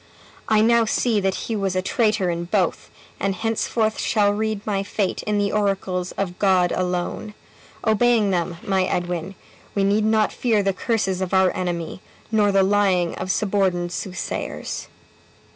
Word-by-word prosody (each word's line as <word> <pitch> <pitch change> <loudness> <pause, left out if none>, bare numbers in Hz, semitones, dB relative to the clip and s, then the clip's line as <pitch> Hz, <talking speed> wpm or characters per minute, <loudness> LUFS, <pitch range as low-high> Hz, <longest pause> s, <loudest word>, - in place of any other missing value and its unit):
I 215 -1 +4
now 230 +1 +4
see 220 0 +1
that 195 -1 0
he 225 - -2
was 195 -3 -1
a 185 - +1
traitor 210 -3 +1
in 170 0 -3
both, 180 -1 0 0.3
and 195 -1 0
henceforth 225 0 -1
shall 205 -3 +2
read 215 -1 -2
my 200 -2 0
fate 195 -1 -2
in 210 -1 +1
the 205 0 +1
oracles 195 -3 -1
of 180 -2 -4
God 185 -3 +3
alone. 180 +3 -2 0.5
Obeying 220 -1 +3
them, 175 -1 -1
my 190 -1 +1
Edwin, 175 +1 -3 0.4
we 200 - +2
need 205 +2 +2
not 215 0 +2
fear 220 -4 +1
the 195 0 +1
curses 190 -2 -1
of 185 0 -1
our 190 -1 +3
enemy, 175 -1 -3 0.3
nor 210 -2 +3
the 195 -1 +4
lying 190 -3 +2
of 185 - -4
suborned 185 -3 0
soothsayers." 185 +1 -4
195 Hz, 160 wpm, -22 LUFS, 185-215 Hz, 0.5 s, I